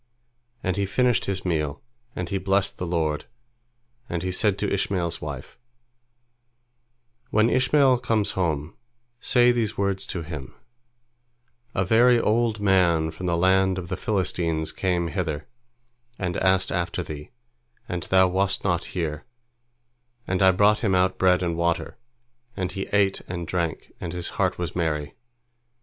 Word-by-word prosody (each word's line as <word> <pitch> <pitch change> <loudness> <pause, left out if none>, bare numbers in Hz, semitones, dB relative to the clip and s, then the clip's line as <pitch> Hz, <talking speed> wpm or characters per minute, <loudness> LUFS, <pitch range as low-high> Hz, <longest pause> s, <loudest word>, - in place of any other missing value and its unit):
And 95 +1 -1
he 100 -1 0
finished 125 +3 +2
his 95 -1 -3
meal, 75 -5 -1 0.4
and 90 -1 -4
he 100 - -1
blessed 95 +1 0
the 90 - -3
Lord, 80 -3 -1 0.8
and 85 0 -2
he 95 - -1
said 100 +2 +1
to 100 -1 -1
Ishmael's 90 -4 -1
wife: 70 -3 -7 1.7
"When 110 +2 +3
Ishmael 130 -1 +4
comes 115 -4 +1
home, 80 -4 -2 0.4
say 125 -1 +4
these 115 -4 -1
words 100 -1 -1
to 85 - -4
him: 75 -5 -8 1.2
A 95 - +1
very 120 +4 +5
old 115 0 +1
man 90 -5 +3
from 90 +3 -6
the 85 -1 +1
land 95 +1 +3
of 90 -2 -6
the 90 - -1
Philistines 85 -7 -1
came 90 -3 -1
hither, 80 -5 -3 0.7
and 90 -2 -2
asked 95 0 +2
after 90 +1 -1
thee, 75 -2 -8 0.6
and 90 -1 -3
thou 95 +1 +4
wast 95 +2 0
not 90 -3 0
here, 75 -3 -2 1.0
and 90 +1 -1
I 95 - +7
brought 105 +3 +4
him 100 -5 +1
out 95 0 +2
bread 90 -1 +4
and 85 -1 -1
water, 85 0 -1 0.6
and 95 -2 -2
he 95 - -4
ate 100 -1 +2
and 85 -1 -4
drank, 85 -2 -2
and 85 -1 -4
his 90 -1 -2
heart 95 -4 0
was 85 -2 -4
merry. 75 -4 -1
90 Hz, 150 wpm, -25 LUFS, 85-100 Hz, 1.7 s, I